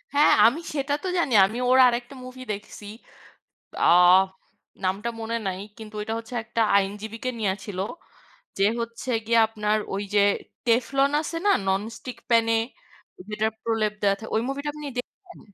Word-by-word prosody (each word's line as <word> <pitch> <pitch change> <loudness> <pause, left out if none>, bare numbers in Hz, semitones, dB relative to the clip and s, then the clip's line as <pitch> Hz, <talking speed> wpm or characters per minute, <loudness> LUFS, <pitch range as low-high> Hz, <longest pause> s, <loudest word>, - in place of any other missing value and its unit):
হ্যাঁ, 295 +1 +6
আমি 240 +8 +4
সেটাতো 285 +4 -2
জানি। 285 -7 +1
আমি 215 +5 -4
ওর 255 - +5
আরেকটা 240 +2 -2
মুভিদেখছি। 230 -5 -8 1.0
আ - - +4 1.0
নামটা 195 +5 -1
মনে 225 +1 -3
নাই। 185 -1 -3 0.2
কিন্তু 220 -1 -10
ওইটা 220 +1 -3
হচ্ছে 230 +2 -11
একটা 230 +1 -2 0.2
আইনজীবীকে 210 +5 -3
নিয়া 200 -3 +1
ছিল। 195 -2 -6 0.8
যে 195 - +2 0.2
হচ্ছে 230 +2 -6 0.2
গিয়া 230 +1 +3
আপনার 215 -1 0 0.2
ওইযে 205 +1 0 0.5
টেফলন 270 +4 +2
আছে 330 +1 -5
না, 410 - +5 0.2
ননস্টিক 220 +6 -3
প্যানে 230 -1 +4 0.8
যেটার 215 +1 -1
প্রলেপ 225 -2 0
দেওয়া 200 -1 +3
থাকে, 225 - -9
ওই 220 - +2
movie-টা 280 +2 -3
আপনি 300 -1 -7
দেখছেন? 360 +8 -9
230 Hz, 145 wpm, -25 LUFS, 210-255 Hz, 1.0 s, হ্যাঁ